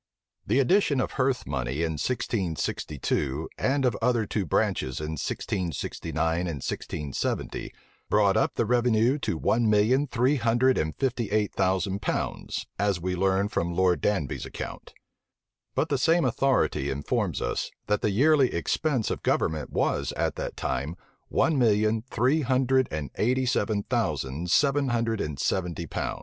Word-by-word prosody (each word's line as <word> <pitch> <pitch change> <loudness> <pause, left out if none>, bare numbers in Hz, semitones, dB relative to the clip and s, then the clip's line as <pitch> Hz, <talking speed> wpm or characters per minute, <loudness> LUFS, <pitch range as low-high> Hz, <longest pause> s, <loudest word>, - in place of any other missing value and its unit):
The - - +2
addition 145 0 +3
of - - -1
hearth 130 -1 0
money 65 +2 -2
in 80 - 0
1662, 80 - -2
and 135 0 +1
of 120 -4 +2
other 120 -2 +2
two 100 -2 -2
branches 65 -2 0
in 75 0 -4
1669 80 -1 -2
and 90 - -2
1670, 70 +2 -3 0.4
brought - - +4
up - - +1
the - - +1
revenue 120 +2 +2
to 85 - -2
one 115 +6 +2
million 115 +7 +3
three 125 +3 +2
hundred 120 +2 +3
and 80 0 -2
fifty 125 -5 -1
eight 105 0 0
thousand 95 +1 0
pounds, - - -3
as 100 -3 +1
we 90 +1 -2
learn 95 +2 +2
from 85 -4 -2
Lord 90 -1 +2
Danby's 95 -10 -1
account: - - -7 0.8
but - - +1
the - - +1
same 165 +1 +3
authority 130 - +1
informs 70 +1 -1
us, - - -2 0.2
that 105 0 0
the - - +1
yearly 135 +5 +4
expense 125 - 0
of - - -3
government 80 -2 0
was - - 0
at - - -1
that - - -5
time 75 +4 -2 0.3
one 160 -4 +2
million 110 -1 +3
three 130 +7 +2
hundred 130 0 +2
and 75 -4 -4
eighty 130 +3 +2
seven 105 -4 0
thousand 75 +2 -2
seven 140 +6 +3
hundred 115 -3 0
and 75 -2 -3
seventy 85 -1 -1
pounds. - - -3
105 Hz, 150 wpm, -27 LUFS, 85-130 Hz, 0.8 s, brought